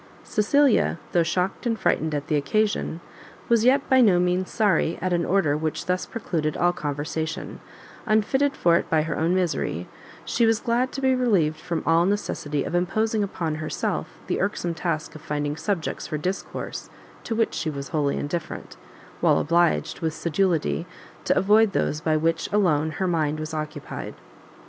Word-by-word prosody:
Cecilia, 240 -1 +3
though 175 - +3
shocked 180 +7 -1
and 230 -1 0
frightened 155 -1 +1
at 145 -1 -3
the 155 - 0
occasion, 170 +3 0 0.5
was 230 -2 +4
yet 270 +2 +4
by 260 -1 +5
no 195 -7 +5
means 180 +1 +1
sorry 195 -6 +1
at 185 +1 -1
an 170 -1 +1
order 180 -7 +2
which 155 0 -2
thus 180 0 -1
precluded 160 -9 -2
all 175 0 +3
conversation; 155 +1 -4 0.5
unfitted 265 +7 +2
for 170 - +4
it - - -3
by 155 -1 +3
her 155 -1 -3
own 165 +4 +1
misery, 150 - -1 0.4
she 230 -1 +2
was 225 -1 +3
glad 245 +2 0
to 270 - -4
be 265 -1 +3
relieved 195 -12 +2
from 170 0 -3
all 165 +2 +4
necessity 150 -8 -1
of - - -5
imposing 215 +5 +1
upon 175 -5 -2
herself 155 - -2 0.2
the - - -1
irksome 190 -3 -1
task 160 -1 -3
of 155 - -11
finding 145 0 -2
subjects 175 0 -3
for 155 - -3
discourse 185 +6 -4 0.3
to 225 - -3
which 225 0 +1
she 160 - -2
was 140 -3 -5
wholly 145 -3 0
indifferent, 165 - -5 0.4
while - - +4
obliged 170 +2 +1
with 160 -2 -2
sedulity 165 - 0 0.4
to - - +2
avoid 210 +1 +4
those 150 -3 0
by 155 -1 +2
which 165 +1 0
alone 160 -7 +2
her 190 - -2
mind 155 -4 0
was 155 +1 -5
occupied. 155 -1 -5
170 Hz, 170 wpm, -24 LUFS, 155-205 Hz, 0.5 s, by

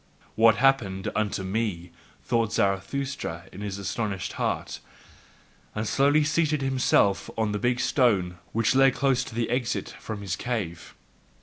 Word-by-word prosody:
"What 115 0 +5
happeneth 115 -8 +1
unto 105 -2 -1
me?" 95 -4 -2 0.3
thought 115 -3 0
Zarathustra 95 -2 -1
in 95 - -10
his 100 -2 -4
astonished 100 0 -3
heart, - - -2 1.0
and 105 +1 -2
slowly 145 +5 +3
seated 150 -1 +1
himself 130 -7 +2
on 110 -2 0
the 105 - -2
big 120 +1 +1
stone 110 -9 +2
which 115 +2 +2
lay 135 +1 +6
close 135 -1 +1
to - - -9
the 115 0 -1
exit 125 -1 -1
from 110 -2 -6
his 95 -4 -2
cave. 105 -9 -4
110 Hz, 140 wpm, -26 LUFS, 100-130 Hz, 1.0 s, lay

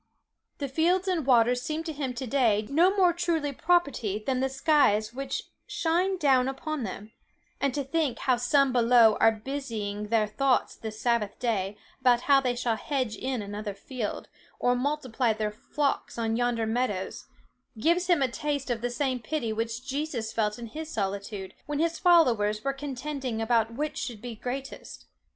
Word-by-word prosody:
The 280 - -3
fields 345 +7 +1
and 335 -7 0
waters 245 -1 +4
seem 310 +4 -3
to 325 -1 -4
him 270 -4 -3
to 260 - -4
day 225 -4 +2
no 335 +6 +5
more 360 -3 +5
truly 335 -4 0
property 280 - +1
than 260 -2 0
the 265 +1 +1
skies 265 -6 +2
which 275 +2 -3 0.2
shine 360 +4 0
down 265 -6 +3
upon 295 +2 -3
them; 210 0 -6 0.5
and 280 - +1
to 285 - -1
think 280 -2 -1
how 255 -2 +1
some 265 +2 +3
below 235 -2 +6
are 225 - +6
busying 220 -4 -4
their 220 0 +2
thoughts 255 +5 +1
this 220 -1 -7
Sabbath 235 -4 0
day 205 -4 -1 0.2
about 250 -2 +4
how 275 0 +5
they 250 -2 0
shall 240 -2 0
hedge 255 -6 -2
in 255 -4 -3
another 205 0 -5
field, 225 +2 -5 0.3
or 245 0 +2
multiply 255 -3 0
their 215 -1 -2
flocks 280 +7 -2
on 225 -1 0
yonder 240 -1 0
meadows, 220 -4 -2 0.5
gives 340 +10 +2
him 345 -6 +3
a - - +3
taste 285 +1 -3
of 230 -2 -2
the 245 - -1
same 255 0 -1
pity 230 -1 -2
which 230 +3 -3
Jesus 270 -6 -3
felt 210 -2 0
in 240 - -7
his 310 +7 -7
solitude, 200 -3 -4
when 295 -1 -2
his 330 +2 0
followers 235 - +4
were 275 - 0
contending 275 -3 -4
about 225 0 +1
which 300 +3 -3
should 235 -4 -5
be 240 +2 -6
greatest. 255 +4 -7
250 Hz, 175 wpm, -28 LUFS, 225-285 Hz, 0.5 s, below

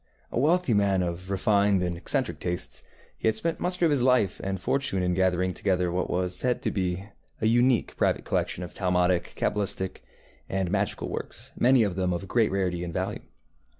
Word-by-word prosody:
A - - -1
wealthy 160 -1 +3
man 100 -2 +2
of 90 +2 -4
refined 100 0 +2
and 90 -1 -1
eccentric 85 - -1
tastes, 90 +1 -3 0.4
he - - 0
had 110 - +3
spent 165 +8 -2
much 180 +1 -1
of 165 - +4
his 140 -4 +3
life 125 -5 +2
and 95 -1 -2
fortune 95 -3 0
in 90 0 +1
gathering 90 0 +1
together 90 -2 0
what 90 +1 -1
was 90 0 -1
said 125 -1 0
to - - 0
be 95 0 -2 0.3
a - - -1
unique 120 +1 +3
private - - +1
collection 90 - -1
of 90 - -8
Talmudic, 90 -1 +1
cabalistic, 95 -2 -1 0.5
and 95 -2 -1
magical 100 -1 -1
works, - - -6
many 125 -1 +4
of 100 -4 -1
them 90 -1 0
of 90 +3 -4
great 115 +2 +2
rarity 90 -3 -1
and 85 - -4
value. - - -3
95 Hz, 185 wpm, -27 LUFS, 90-110 Hz, 0.5 s, of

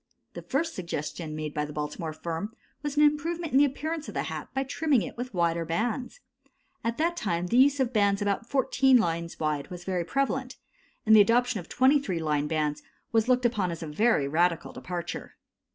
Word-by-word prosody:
The - - -7
first 320 +5 -1
suggestion 160 -2 -5
made 155 -1 -4
by 150 - -1
the 150 0 -6
Baltimore 150 +2 -4
firm 170 +7 -5 0.3
was 295 0 -4
an 300 - +6
improvement 320 +3 +1
in 265 - +5
the 290 - +7
appearance 310 +3 -3
of - - -8
the - - 0
hat - - -5
by 270 - -1
trimming 275 -2 +1
it - - -7
with 250 +1 -5
wider 170 -3 +1
bands. 235 - -2 0.6
At 230 0 -1
that 335 +2 +1
time 175 - -1
the 230 +7 +1
use 280 +2 +5
of 260 -1 0
bands 200 -2 +3
about 205 +3 -1
14 265 -1 +4
lines 170 -6 -1
wide 150 -1 -1
was 180 -1 -8
prevalent, 255 +8 -1 0.5
and 220 0 +7
the 215 - +9
adoption 240 +1 +2
of 175 - -10
23 260 - +3
line 150 -2 0
bands 150 -1 -1 0.3
was 225 0 +2
looked 250 0 +3
upon 210 -6 +1
as 165 -1 -5
a - - -5
very 150 -1 +2
radical 170 +2 +1
departure. 175 -1 -6
210 Hz, 195 wpm, -28 LUFS, 165-265 Hz, 0.6 s, the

